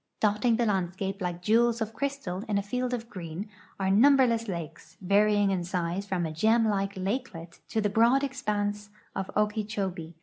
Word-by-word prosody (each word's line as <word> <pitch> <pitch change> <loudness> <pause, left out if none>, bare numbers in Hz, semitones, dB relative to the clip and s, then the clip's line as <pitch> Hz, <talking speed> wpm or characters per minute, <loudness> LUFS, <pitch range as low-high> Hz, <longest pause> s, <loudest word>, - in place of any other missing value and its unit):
Dotting 215 +3 +2
the 235 +1 +1
landscape 195 0 -2
like 175 -1 -3
jewels 230 +3 +3
of 220 -1 -3
crystal 255 -7 -3
in 205 - +1
a 200 - 0
field 250 +4 -2
of 235 -2 -3
green 185 -2 -6 0.3
are 190 0 +1
num 275 +8 +6
berless 230 -3 +2
lakes, 170 -4 -7
varying 205 +1 +3
in 185 -2 -1
size 180 +2 -2
from 180 -3 -1
a 160 - -3
gem 220 +8 +3
like 195 -1 -1
lakelet 185 -4 -4
to 225 - -1
the 205 - +2
broad 235 +6 +3
expanse 210 -6 -2 0.3
of 190 -1 -3
Okeechobee. 205 -6 -2
205 Hz, 175 wpm, -28 LUFS, 185-225 Hz, 0.3 s, num